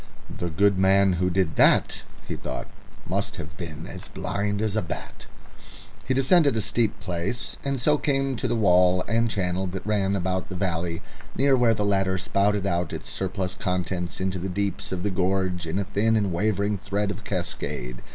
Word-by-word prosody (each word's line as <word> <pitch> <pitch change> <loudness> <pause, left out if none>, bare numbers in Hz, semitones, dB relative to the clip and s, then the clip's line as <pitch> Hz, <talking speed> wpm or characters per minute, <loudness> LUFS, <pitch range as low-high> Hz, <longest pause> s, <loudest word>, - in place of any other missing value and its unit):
"The 85 - -2
good 100 +4 +3
man 95 0 +5
who 90 +1 +1
did 90 -3 0
that," - - +4 0.3
he - - -3
thought, - - -5 0.4
"must - - -1
have 75 -2 -8
been 80 0 -7
as - - -7
blind 100 0 -2
as 110 -1 -1
a 110 - +2
bat." 85 - -7 0.8
He 130 - +1
descended 140 -1 +4
a - - +2
steep 110 +1 0
place, 100 +4 -3
and 140 -1 -1
so 150 +4 +3
came 135 -2 +1
to - - -1
the - - 0
wall 90 -3 +4
and 115 +1 +2
channel 95 -2 -1
that 90 +1 -6
ran 100 -2 +1
about 95 0 -1
the 95 - -5
valley, 85 -2 -2 0.3
near 135 +2 +4
where 120 -3 +4
the 105 - -1
latter 95 -2 +2
spouted 100 +1 +1
out 85 -4 -1
its - - -6
surplus 95 -1 -2
contents 90 -2 -2
into 95 -1 -1
the 95 +2 -3
deeps 100 +1 -2
of 90 -1 -3
the 105 - 0
gorge 95 -1 0
in 80 +4 -2
a 100 - +1
thin 100 +3 +1
and 100 -4 +1
wavering 100 +2 0
thread 100 +2 -1
of 105 - -7
cascade. 60 -10 -4
95 Hz, 190 wpm, -25 LUFS, 90-105 Hz, 0.8 s, man